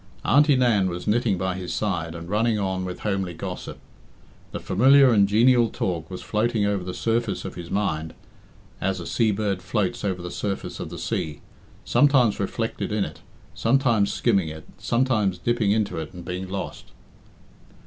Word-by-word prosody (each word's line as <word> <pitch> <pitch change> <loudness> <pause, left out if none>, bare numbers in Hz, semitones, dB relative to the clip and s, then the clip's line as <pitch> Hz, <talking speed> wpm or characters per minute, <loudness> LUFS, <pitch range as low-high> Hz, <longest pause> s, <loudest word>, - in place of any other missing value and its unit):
Auntie 145 +2 +5
Nan 115 -7 +3
was 90 0 -5
knitting 110 -2 +1
by 95 0 -1
his 90 -1 -5
side 85 -6 -2
and 85 0 -8
running 110 +3 +1
on 95 -2 -2
with 90 -1 -6
homely 95 -4 -2
gossip. - - -6 0.7
The - - -4
familiar 135 +6 +5
and 100 -3 +5
genial 120 +3 +4
talk 85 -6 -3
was 90 - -7
floating 110 0 0
over 100 -2 0
the 90 - -4
surface 115 -2 -1
of - - -5
his 85 -1 -8
mind 80 -6 -2 0.7
as 95 -1 -1
a 85 - -6
sea 115 +5 +1
bird 100 -2 -1
floats 105 -3 -1
over 95 -3 -2
the 90 - -5
surface 100 -2 -4
of - - -5
the - - -8
sea, 75 -2 -3 0.4
sometimes 135 -7 +4
reflected 115 +3 -2
in 105 -2 +1
it, 75 0 -9 0.3
sometimes 115 -4 +2
skimming 95 -4 +1
it, 80 0 -9
sometimes 115 -7 +1
dipping 115 +2 0
into 105 -3 0
it 80 +3 -7
and 90 -1 -9
being 90 +1 -5
lost. 95 0 -5
100 Hz, 170 wpm, -24 LUFS, 90-115 Hz, 0.7 s, Auntie